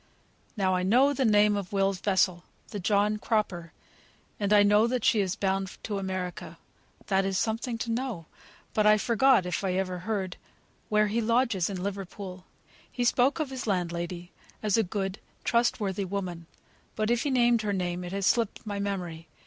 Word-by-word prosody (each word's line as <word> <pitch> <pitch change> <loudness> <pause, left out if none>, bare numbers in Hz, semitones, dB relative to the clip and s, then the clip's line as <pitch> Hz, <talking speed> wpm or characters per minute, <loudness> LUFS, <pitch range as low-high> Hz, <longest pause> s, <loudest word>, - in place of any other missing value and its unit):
"Now 190 -2 +2
I 180 - +1
know 250 +10 +4
the 265 -2 0
name 210 -1 +4
of 200 -3 -4
Will's 195 -1 +1
vessel 185 -3 +1 0.3
the 210 - -5
John 205 +2 +2
Cropper; 200 -7 -1 0.7
and 205 -1 -1
I 205 -1 +7
know 210 +2 +4
that 245 -1 -1
she 220 - +4
is 185 -2 -1
bound 195 -1 -2
to 205 -2 -3
America. 185 -2 -5 0.5
That 195 -1 +2
is 195 -1 -1
something 230 +3 -1
to 230 0 -3
know. 230 -8 -3 0.5
But 215 -1 +3
I 215 0 +6
forget, 235 0 +3
if 180 +2 -2
I 190 -2 0
ever 185 -1 -2
heard, 190 -1 -3 0.5
where 210 0 +3
he 215 +3 0
lodges 230 -5 +1
in 185 -2 -4
Liverpool. 195 -1 -6 0.5
He 245 - -2
spoke 250 +5 +3
of 300 -4 -2
his 260 -3 -5
landlady, 175 -2 -2 0.3
as 210 -2 +2
a 225 - +4
good, 195 0 -3 0.2
trustworthy 210 -4 +1
woman; 180 -3 -4 0.5
but 215 +1 0
if 240 -1 +2
he 290 - -1
named 240 -3 +3
her 210 -1 -1
name, 180 -1 -2
it 175 - -6
has 195 0 -2
slipped 230 0 +1
my 205 -1 -3
memory. 180 -5 -4
200 Hz, 180 wpm, -28 LUFS, 185-225 Hz, 0.7 s, I